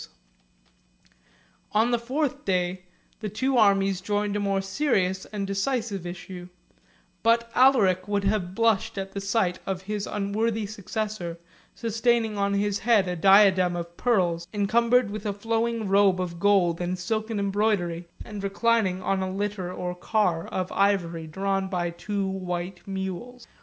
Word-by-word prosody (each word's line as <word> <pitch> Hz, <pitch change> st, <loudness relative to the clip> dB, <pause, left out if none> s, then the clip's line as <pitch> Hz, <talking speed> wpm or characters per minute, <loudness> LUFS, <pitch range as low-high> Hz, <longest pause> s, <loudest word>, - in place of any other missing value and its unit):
] -, -, -35 dB
On 225 Hz, +3 st, +3 dB
the 240 Hz, -, +2 dB
fourth 265 Hz, +4 st, -2 dB
day, 180 Hz, -1 st, -1 dB, 0.3 s
the 215 Hz, -, -4 dB
two 260 Hz, +6 st, -1 dB
armies 195 Hz, -3 st, +3 dB
joined 205 Hz, +1 st, -1 dB
a -, -, 0 dB
more 200 Hz, -1 st, 0 dB
serious 195 Hz, -3 st, 0 dB
and 205 Hz, -2 st, -4 dB
decisive 200 Hz, -1 st, -2 dB
issue; 180 Hz, 0 st, -8 dB, 0.7 s
but 230 Hz, 0 st, +2 dB
Alaric 210 Hz, -8 st, +4 dB
would 205 Hz, -1 st, 0 dB
have 195 Hz, -3 st, -1 dB
blushed 225 Hz, -3 st, +1 dB
at 195 Hz, 0 st, -4 dB
the 200 Hz, -, -5 dB
sight 195 Hz, -3 st, 0 dB
of 190 Hz, -1 st, -3 dB
his 205 Hz, +1 st, -3 dB
unworthy 210 Hz, +2 st, -1 dB
successor, 205 Hz, -3 st, -4 dB, 0.4 s
sustaining 230 Hz, -1 st, +1 dB
on 200 Hz, 0 st, 0 dB
his 205 Hz, 0 st, 0 dB
head 215 Hz, -5 st, +3 dB
a 180 Hz, -, -2 dB
diadem 190 Hz, 0 st, +5 dB
of 170 Hz, 0 st, -6 dB
pearls, 175 Hz, -8 st, +1 dB
encumbered 230 Hz, +2 st, +2 dB
with 215 Hz, 0 st, -5 dB
a 205 Hz, -, -1 dB
flowing 225 Hz, +1 st, -1 dB
robe 195 Hz, -1 st, +4 dB
of 175 Hz, -2 st, -4 dB
gold 180 Hz, -4 st, +3 dB
and 180 Hz, +1 st, -2 dB
silken 215 Hz, +4 st, -2 dB
embroidery, 200 Hz, -4 st, 0 dB, 0.2 s
and 210 Hz, -2 st, -7 dB
reclining 195 Hz, -2 st, +1 dB
on 195 Hz, 0 st, 0 dB
a 190 Hz, -, -2 dB
litter, 195 Hz, -2 st, -3 dB
or 180 Hz, -1 st, -4 dB
car 180 Hz, -2 st, 0 dB
of 185 Hz, 0 st, -3 dB
ivory, 175 Hz, -5 st, +1 dB
drawn 195 Hz, +3 st, -1 dB
by 175 Hz, -2 st, -2 dB
two 200 Hz, +3 st, -3 dB
white 180 Hz, -1 st, -4 dB
mules. 195 Hz, +6 st, -5 dB
200 Hz, 150 wpm, -26 LUFS, 185-215 Hz, 0.7 s, diadem